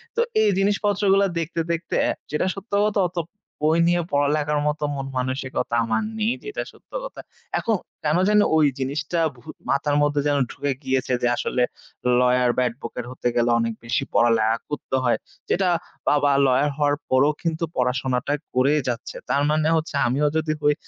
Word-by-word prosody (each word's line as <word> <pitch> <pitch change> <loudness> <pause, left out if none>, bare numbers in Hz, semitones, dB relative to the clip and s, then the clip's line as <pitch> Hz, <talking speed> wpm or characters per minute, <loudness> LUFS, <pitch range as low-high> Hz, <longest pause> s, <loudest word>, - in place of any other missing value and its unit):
তো 470 - +2 0.2
এই 215 - +4
জিনিসপত্রগুলা 200 0 +2
দেখতে, 165 +1 -3
দেখতে 170 +1 -2
অ্যা - - +1 0.2
যেটা 150 - 0
সত্য 195 +3 -11
কথা 210 -1 +1
অত 180 - -18 0.5
বই 160 +2 +3
নিয়ে 175 0 +3
পড়ালেখার 145 +1 +1
মতো 150 0 -1
মন-মানসিকতা 135 -2 -3
আমার 110 - 0
নেই। 220 +2 +1
যেটা 420 0 -4
সত্য - - -24
কথা। - - -7 0.4
এখন 225 - +1 0.3
কেন 150 +2 +2
যেন 210 0 +5 0.2
ওই 155 -1 +5
জিনিসটা 145 +5 -2 0.2
ভু - - -17 0.3
মাথার 145 +1 +1
মধ্যে 145 0 +2
যেন 145 -1 +2
ঢুকে 145 -1 -2
গিয়েছে। 130 -1 0
যে 120 - +2
আসলে 125 - -1 0.6
ল্ইয়ার 125 0 +3
বা - - +3
এডভোকেট 120 0 -7
হতে 130 - -3
গেলে 120 0 +2
অনেক 115 0 0
বেশি 115 +1 0
পড়ালেখা 115 -1 +3
করতে 145 -2 -3
হয়। 120 - +2 0.3
যেটা 185 0 +2 0.4
বাবা 145 -1 +3 0.2
লইয়ার 135 +3 +3
হওয়ার 145 -1 +2
পরেও 135 +4 +4
কিন্তু 165 0 -1
পড়াশোনাটা 125 +2 0 0.2
করেই 140 +4 +3
যাচ্ছে। 120 -2 -4
তার 140 - +2
মানে 155 0 +2
হচ্ছে 155 -1 -3
আমিও 140 +5 +1
যদি 155 -1 0
হই, 150 0 +4
145 Hz, 165 wpm, -23 LUFS, 130-165 Hz, 0.6 s, যেন